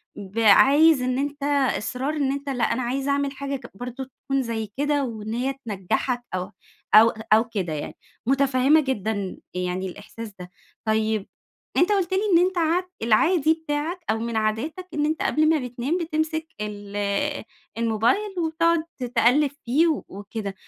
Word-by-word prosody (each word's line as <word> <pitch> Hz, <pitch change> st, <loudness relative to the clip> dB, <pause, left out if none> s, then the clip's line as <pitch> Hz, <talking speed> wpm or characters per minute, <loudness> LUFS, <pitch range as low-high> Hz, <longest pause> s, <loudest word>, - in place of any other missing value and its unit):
ب 200 Hz, +3 st, -6 dB
عايز 275 Hz, +7 st, +6 dB
إن 250 Hz, 0 st, 0 dB
أنت 285 Hz, +1 st, -3 dB, 0.3 s
إصرار 260 Hz, +7 st, -3 dB
أنت 280 Hz, -1 st, -1 dB
لأ، 250 Hz, -3 st, -1 dB
أنا 255 Hz, -, -2 dB
عايز 265 Hz, +3 st, -2 dB
أعمل 280 Hz, 0 st, +1 dB
حاجة 280 Hz, 0 st, -4 dB
ك 270 Hz, -, -9 dB
برضه 250 Hz, +3 st, -6 dB, 0.2 s
تكون 275 Hz, 0 st, 0 dB
زي 225 Hz, -3 st, -3 dB
كده، 290 Hz, 0 st, +1 dB
وإن 220 Hz, -3 st, -5 dB
هي 255 Hz, +3 st, -1 dB
تنجّحك 220 Hz, +4 st, -1 dB
أو 185 Hz, +1 st, -4 dB, 0.4 s
أو 220 Hz, +2 st, +9 dB
أو 220 Hz, 0 st, +2 dB
كده 185 Hz, -8 st, -2 dB
يعني. 150 Hz, -, -5 dB, 0.3 s
مُتفهّمة 270 Hz, +3 st, +4 dB
جدًا 215 Hz, -7 st, -2 dB, 0.2 s
يعني 180 Hz, +1 st, -2 dB
الإحساس 210 Hz, +4 st, -9 dB
ده. 180 Hz, 0 st, -8 dB, 0.4 s
طيب، 220 Hz, -1 st, +1 dB, 0.5 s
أنت 360 Hz, +4 st, +4 dB
قُلت 380 Hz, -3 st, +1 dB
لي 380 Hz, -, +2 dB
إن 340 Hz, -, +7 dB
أنت 375 Hz, -1 st, -2 dB
عاد 340 Hz, +2 st, +2 dB, 0.2 s
العادي 305 Hz, +8 st, +4 dB
بتاعك، 300 Hz, +4 st, -2 dB
أو 220 Hz, -, +1 dB
من 230 Hz, 0 st, -3 dB
عاداتك 225 Hz, -, -2 dB
إن 295 Hz, -, +1 dB
أنت 315 Hz, 0 st, -1 dB
قبل 310 Hz, +1 st, +2 dB
ما 320 Hz, 0 st, +4 dB
بتنام 250 Hz, +5 st, -2 dB
بتمسك 315 Hz, -1 st, -2 dB
ال 205 Hz, -1 st, -6 dB, 0.8 s
الموبايل 235 Hz, -, +1 dB
وتقعد 330 Hz, 0 st, +1 dB
ت 255 Hz, -, -3 dB
تقلِّب 250 Hz, +4 st, +3 dB
فيه 280 Hz, +8 st, +3 dB
و 315 Hz, -3 st, 0 dB
وكده. 200 Hz, 0 st, -6 dB
255 Hz, 160 wpm, -24 LUFS, 220-305 Hz, 0.8 s, أو